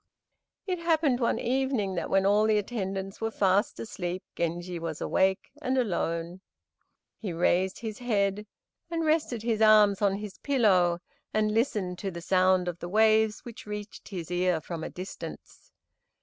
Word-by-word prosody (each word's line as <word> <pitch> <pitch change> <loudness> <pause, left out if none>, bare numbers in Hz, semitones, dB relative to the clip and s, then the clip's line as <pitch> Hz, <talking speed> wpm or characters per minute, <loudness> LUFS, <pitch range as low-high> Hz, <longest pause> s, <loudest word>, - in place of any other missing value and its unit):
It 365 -3 -2
happened 315 -6 +2
one 235 - +1
evening 255 -6 0
that 175 - -3
when 195 0 +3
all 205 +2 +4
the 215 -1 +3
attendants 195 -2 -3
were 225 - 0
fast 200 0 +1
asleep 185 -3 -4
Genji 175 +1 -2
was 165 -2 -4
awake 190 +1 +1
and 260 -2 0
alone. 175 -6 -1 0.8
He 205 -5 -4
raised 180 +3 +1
his 220 -2 -5
head 210 -3 0 0.4
and 330 -1 -1
rested 305 -8 +1
his 225 -2 0
arms 210 -2 +6
on 200 -1 +3
his 205 -1 -7
pillow 185 -11 +3 0.3
and 215 0 +2
listened 210 -6 0
to 195 - -3
the 170 -2 -7
sound 185 0 +3
of 175 -1 -4
the 175 - -6
waves 220 +1 +3
which 235 -3 -10
reached 210 0 -7
his 180 -4 -6
ear 180 -1 +1
from 160 +1 -6
a - - -4
distance. 185 +2 -9
200 Hz, 160 wpm, -28 LUFS, 180-225 Hz, 0.8 s, arms